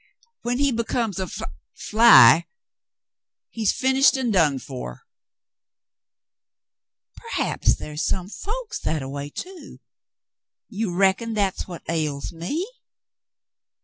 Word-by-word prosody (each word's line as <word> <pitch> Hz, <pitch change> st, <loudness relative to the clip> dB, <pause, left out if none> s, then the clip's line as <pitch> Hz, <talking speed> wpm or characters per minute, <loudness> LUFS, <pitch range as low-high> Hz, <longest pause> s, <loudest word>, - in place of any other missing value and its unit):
Wlien 245 Hz, +1 st, -1 dB
he 280 Hz, 0 st, +2 dB
becomes 230 Hz, -3 st, -2 dB
af 185 Hz, -2 st, -5 dB, 0.2 s
— -, -, -59 dB, 0.2 s
fly, 170 Hz, -, +7 dB, 1.0 s
he's 220 Hz, -3 st, +1 dB
finished 265 Hz, +1 st, +3 dB
and 245 Hz, -4 st, -1 dB
done 155 Hz, -7 st, +3 dB
for." 125 Hz, -, -8 dB, 2.1 s
"P'r'aps -, -, 0 dB
ther -, -, -8 dB
is 150 Hz, +1 st, -3 dB
some 185 Hz, -1 st, -1 dB
folks 445 Hz, -, -6 dB
that 155 Hz, -2 st, -2 dB
a -, -, -6 dB
way, 140 Hz, +1 st, -6 dB
too. 355 Hz, -, -9 dB, 0.9 s
You 205 Hz, -4 st, -3 dB
reckon 195 Hz, +4 st, +1 dB
that's 200 Hz, -3 st, -1 dB
what 175 Hz, -2 st, -9 dB
ails 150 Hz, -4 st, -2 dB
me 185 Hz, -, -3 dB
195 Hz, 115 wpm, -23 LUFS, 155-245 Hz, 2.1 s, fly